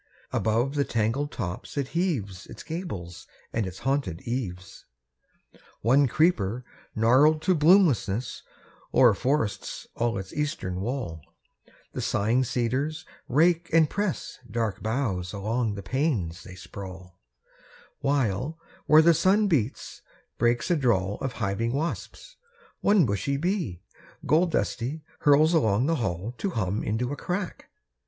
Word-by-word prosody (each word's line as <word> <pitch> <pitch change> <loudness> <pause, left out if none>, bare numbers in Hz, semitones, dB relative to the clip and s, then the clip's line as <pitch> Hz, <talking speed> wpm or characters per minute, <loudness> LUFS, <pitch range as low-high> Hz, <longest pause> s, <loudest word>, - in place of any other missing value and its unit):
Above 115 +5 +1
the 145 -1 +2
tangled 115 +5 -1
tops 95 +4 -5
it 135 -2 -1
heaves 120 - -2
Its - - -10
gables 145 - -6 0.3
and 110 -4 0
its 95 0 -8
haunted 135 - -1
eaves. 95 -7 -5 0.7
2. - - -22 0.2
One 135 +5 +4
creeper, 125 - +1 0.3
gnarled 130 +8 +5
to 185 - +3
bloomlessness, 150 - +3 0.5
O'er 120 -4 +7
forests 130 0 -1
all 115 -3 -1
its 95 -1 -7
eastern 95 -11 -2
wall; 110 - -3 0.7
The - - -3
sighing 115 +6 +1
cedars 130 +7 -1 0.2
rake 170 +5 +3
and 165 -1 +5
press 205 -4 -3
Dark 110 -3 -2
boughs 110 -6 -2
along 110 +2 -1
the 100 - -7
panes 100 - -1
they 90 - -11
sprawl; 95 -1 -10 0.8
While, 140 +1 0 0.3
where 155 +1 +7
the 170 +1 +6
sun 190 +6 +3
beats, 140 - -1 0.4
breaks 120 +8 +2
a - - +5
drawl 105 - +1
Of 135 -2 -2
hiving 110 +2 -1
wasps; 165 - -4 0.4
one 200 -5 +4
bushy 115 +6 -1
bee, 160 - -2 0.4
Gold 170 +3 +3
dusty, 150 0 -2 0.2
hurls 150 +3 +5
along 115 -7 +3
the 165 +2 +1
hall 100 0 -3
To 200 - -1
hum 105 - -1
into 120 +5 -1
a - - -3
crack. 180 +4 -4
125 Hz, 135 wpm, -26 LUFS, 100-155 Hz, 0.8 s, O'er